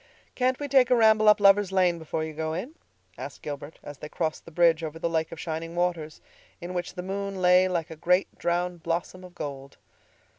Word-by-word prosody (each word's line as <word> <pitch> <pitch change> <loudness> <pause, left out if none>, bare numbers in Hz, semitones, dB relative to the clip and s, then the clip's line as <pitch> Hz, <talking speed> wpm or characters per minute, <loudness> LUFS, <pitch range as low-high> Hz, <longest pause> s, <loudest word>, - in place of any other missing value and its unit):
"Can't 255 0 0
we 290 - -3
take 265 -3 +4
a 250 - +5
ramble 220 -2 +5
up 210 0 +5
Lovers' 200 -1 +5
Lane 180 -3 +2
before 160 0 -3
you 160 0 -5
go 160 +1 -3
in?" 225 - -5 0.5
asked - - -8
Gilbert 145 +1 -7
as 145 -2 -9
they 150 - -8
crossed 160 -1 -3
the - - -10
bridge 165 -1 +3
over 160 0 -5
the 170 +1 -1
Lake 160 -1 -1
of 165 - -8
Shining 165 +1 -5
Waters, 170 -3 -2 0.4
in 175 +1 -7
which 175 0 -4
the 180 - -5
moon 195 0 -4
lay 180 0 +5
like 170 -3 -2
a - - -7
great, 180 +4 +1
drowned 175 0 -1
blossom 170 +2 -3
of 180 -1 -13
gold. 140 -3 -7
175 Hz, 215 wpm, -26 LUFS, 160-190 Hz, 0.5 s, a